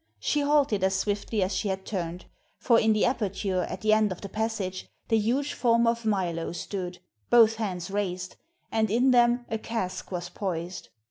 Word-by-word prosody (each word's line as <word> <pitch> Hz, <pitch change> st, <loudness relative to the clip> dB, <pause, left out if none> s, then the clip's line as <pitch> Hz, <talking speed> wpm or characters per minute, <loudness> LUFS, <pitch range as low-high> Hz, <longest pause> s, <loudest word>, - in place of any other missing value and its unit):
She 295 Hz, -, 0 dB
halted 285 Hz, -9 st, +2 dB
as 190 Hz, 0 st, +2 dB
swiftly 205 Hz, +1 st, -1 dB
as 185 Hz, -, -1 dB
she 215 Hz, -, -1 dB
had 190 Hz, -1 st, -3 dB
turned; 175 Hz, -3 st, -4 dB, 0.3 s
for 235 Hz, -2 st, +4 dB
in 220 Hz, -, +3 dB
the 215 Hz, -1 st, +3 dB
aperture 200 Hz, -6 st, -1 dB
at -, -, -6 dB
the 215 Hz, 0 st, +3 dB
end 215 Hz, -2 st, +3 dB
of 185 Hz, -, -6 dB
the 200 Hz, -, -6 dB
passage 215 Hz, -3 st, -3 dB, 0.2 s
the 225 Hz, -1 st, +4 dB
huge 260 Hz, +7 st, 0 dB
form 235 Hz, -1 st, +3 dB
of 230 Hz, 0 st, 0 dB
Milo 175 Hz, -6 st, -1 dB
stood, 180 Hz, 0 st, -5 dB, 0.3 s
both 225 Hz, -2 st, +6 dB
hands 190 Hz, -4 st, -3 dB
raised, 185 Hz, -2 st, -3 dB, 0.4 s
and 220 Hz, -1 st, +1 dB
in 245 Hz, +5 st, +3 dB
them 240 Hz, 0 st, +4 dB
a 220 Hz, -, -3 dB
cask 195 Hz, -6 st, -4 dB
was 175 Hz, -1 st, -3 dB
poised. 175 Hz, -1 st, -5 dB
210 Hz, 185 wpm, -27 LUFS, 185-230 Hz, 0.4 s, both